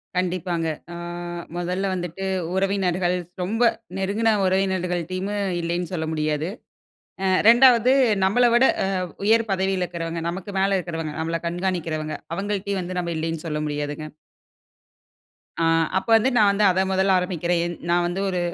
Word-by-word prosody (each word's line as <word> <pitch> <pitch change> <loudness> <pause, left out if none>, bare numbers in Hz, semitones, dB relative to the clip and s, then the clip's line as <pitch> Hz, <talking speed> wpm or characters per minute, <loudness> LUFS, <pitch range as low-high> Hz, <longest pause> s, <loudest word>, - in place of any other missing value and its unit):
கண்டிப்பாங்க. 180 -2 -1 0.3
அ - - -7 0.6
மொதல்ல 180 +3 -1
வந்துட்டு 180 +1 -4 0.3
உறவினர்கள் 190 -2 +1 0.3
ரொம்ப 225 +6 0 0.3
நெருங்குன 210 +4 +1
உறவினர்கள்டைம்மே 185 +1 -1 0.2
இல்லைன்னு 170 +1 -2
சொல்ல 160 -2 -2
முடியாது. 155 +1 -1 0.8
அ - - +2 0.2
2வது 245 +1 +7 0.3
நம்பள 235 +6 +3
விட 240 - +5 0.2
அ - - +1 0.4
உயர் 225 +1 +3
பதவியில 190 -1 0
இருக்கிறவங்க 165 -1 -4
நமக்கு 185 +3 -5
மேல 195 0 +2
இருக்கிறவங்க, 165 -3 -4
நம்மள 165 +1 -2
கண்காணிக்கிறவங்க 170 -3 -2 0.2
அவுங்கள்ட்டயும் 200 0 -2
வந்து 180 +1 -4
நம்ப 170 -1 -3
இல்லைன்னு 165 0 -3
சொல்ல 150 -1 -2
முடியாதுங்க. 150 +1 -4 1.5
ஆ. - - +3 0.3
அப்ப 190 - -2
வந்து 230 +4 +4
நான் 210 -2 +6
வந்து 200 +1 +1
அத 185 +1 +1
மொதல்ல 190 0 +3
ஆரம்பிக்கிறேன். 175 -1 -1
என் 175 -1 -4
நா 170 - +4
வந்து 180 +3 -3
ஒரு 180 - -1
180 Hz, 135 wpm, -23 LUFS, 170-195 Hz, 1.5 s, 2வது